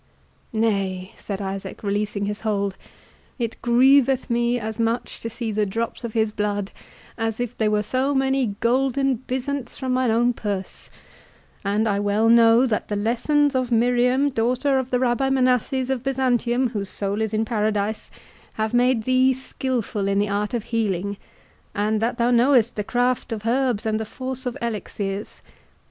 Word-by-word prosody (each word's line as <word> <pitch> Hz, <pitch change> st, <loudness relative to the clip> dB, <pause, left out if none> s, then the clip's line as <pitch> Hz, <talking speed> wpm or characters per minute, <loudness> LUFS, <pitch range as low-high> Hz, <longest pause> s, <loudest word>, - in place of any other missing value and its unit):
"Nay," 195 Hz, -4 st, -1 dB
said 200 Hz, -1 st, -5 dB
Isaac, 195 Hz, +2 st, -6 dB
releasing 205 Hz, 0 st, -1 dB
his 205 Hz, +1 st, -3 dB
hold, 200 Hz, -3 st, -1 dB, 0.6 s
"it 230 Hz, -3 st, -4 dB
grieveth 260 Hz, +1 st, +4 dB
me 240 Hz, +1 st, +1 dB
as 220 Hz, 0 st, -5 dB
much 230 Hz, +1 st, -1 dB
to 230 Hz, -, -4 dB
see 230 Hz, 0 st, -4 dB
the 210 Hz, 0 st, +1 dB
drops 230 Hz, +5 st, -3 dB
of 235 Hz, -2 st, -5 dB
his 220 Hz, -1 st, +1 dB
blood, 205 Hz, -1 st, -2 dB, 0.5 s
as 225 Hz, 0 st, -2 dB
if 245 Hz, 0 st, -3 dB
they 215 Hz, -1 st, +1 dB
were 210 Hz, 0 st, +1 dB
so 265 Hz, +5 st, 0 dB
many 265 Hz, -5 st, +1 dB
golden 265 Hz, +2 st, +2 dB
byzants 260 Hz, +1 st, -4 dB
from 260 Hz, -1 st, -2 dB
mine 255 Hz, -1 st, +2 dB
own 240 Hz, +2 st, +3 dB
purse; 200 Hz, -4 st, -4 dB, 0.7 s
and 210 Hz, +3 st, +1 dB
I 200 Hz, -1 st, +1 dB
well 205 Hz, +2 st, +2 dB
know, 230 Hz, +1 st, +6 dB
that 225 Hz, -5 st, -1 dB
the 205 Hz, -, -2 dB
lessons 250 Hz, +7 st, +1 dB
of 255 Hz, -2 st, -1 dB
Miriam, 250 Hz, +4 st, +3 dB
daughter 255 Hz, +4 st, +1 dB
of 260 Hz, -1 st, -4 dB
the 250 Hz, -, +2 dB
Rabbi 255 Hz, +2 st, +1 dB
Manasses 255 Hz, 0 st, +1 dB
of 260 Hz, -3 st, -1 dB
Byzantium 255 Hz, -1 st, +1 dB
whose 205 Hz, -4 st, -4 dB
soul 200 Hz, +1 st, -2 dB
is 220 Hz, -1 st, -1 dB
in 220 Hz, 0 st, 0 dB
Paradise, 215 Hz, -1 st, -1 dB, 0.4 s
have 220 Hz, +1 st, -2 dB
made 245 Hz, -1 st, +3 dB
thee 255 Hz, +2 st, +3 dB
skilful 245 Hz, -6 st, -3 dB
in 195 Hz, 0 st, +1 dB
the 205 Hz, 0 st, +1 dB
art 205 Hz, +3 st, -1 dB
of 230 Hz, -, -2 dB
healing, 200 Hz, -4 st, -1 dB, 0.6 s
and 210 Hz, +1 st, 0 dB
that 235 Hz, +1 st, 0 dB
thou 240 Hz, 0 st, +2 dB
knowest 240 Hz, -1 st, +4 dB
the 210 Hz, -, -2 dB
craft 245 Hz, +2 st, 0 dB
of 220 Hz, -1 st, -4 dB
herbs, 245 Hz, -2 st, +1 dB
and 215 Hz, 0 st, 0 dB
the 220 Hz, -, -3 dB
force 260 Hz, +3 st, -5 dB
of 245 Hz, -, -4 dB
elixirs. 205 Hz, -2 st, -4 dB
230 Hz, 170 wpm, -23 LUFS, 210-255 Hz, 0.7 s, know